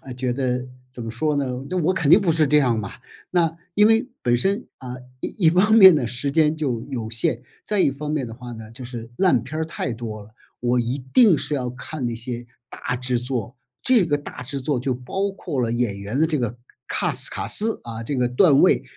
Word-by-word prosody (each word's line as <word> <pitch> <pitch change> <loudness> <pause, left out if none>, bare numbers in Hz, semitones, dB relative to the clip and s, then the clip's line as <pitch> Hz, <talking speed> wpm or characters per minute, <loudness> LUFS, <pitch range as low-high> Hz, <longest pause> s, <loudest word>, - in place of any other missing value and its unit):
哎， 130 - -9
觉 125 0 -2
得 125 -1 -2 0.2
怎 120 -2 -7
么 115 - -5
说 150 +5 -1
呢， 140 -2 0 0.2
那 185 - -3
我 175 +3 +2
肯 160 -6 0
定 205 - +8
不 180 -4 +1
是 155 -2 +3
这 150 +2 +4
样 120 -5 +2
嘛。 100 -2 -5 0.4
那 165 -2 +1 0.2
因 210 +1 +5
为 225 +4 +3
本 120 0 +2
身， 200 - -1
啊， 125 -1 -7 0.3
一 180 -6 -1
一 - - +7
方 195 +6 +3
面 190 -5 +9
呢， 135 -6 0
时 125 +4 -2
间 155 +1 +2
就 130 -7 -2
有 115 -4 -4
限， 115 +1 +1 0.2
再 210 -2 0
一 140 - +4
方 150 +2 -6
面 145 -5 -1
的 115 - -8
话 125 0 -9
呢， 110 -1 -10
就 125 +2 -10
是 120 -2 -8
烂 180 - +3
片 155 - -6
儿 - - 0
太 140 -5 -4
多 110 -2 -6
了， 105 - -16 0.3
我 125 0 +1
一 120 +4 -2
定 215 -10 +6
是 150 - -2
要 125 -3 -2
看 130 +1 -6
那 115 - -2
些 120 +1 -6 0.2
大 125 - -4
制 125 -1 -1
作。 125 0 -4 0.3
这 240 -8 +4
个 145 -2 0
大 135 -3 -9
制 135 +2 -5
作 130 -2 -1
就 130 0 -1
包 190 +11 -3
括 165 -8 -4
了 115 - -1
演 115 -4 -1
员 105 +7 -4
的 160 - +4
这 155 -4 -1
个 120 0 -3 0.3
CAST - - +2
卡 - - -4
斯 220 +2 +5
啊， 115 -1 -6
这 135 +4 -3
个 125 -1 +1
段 140 +3 +4
位， - - +4
130 Hz, 265 characters per minute, -22 LUFS, 120-160 Hz, 0.4 s, 面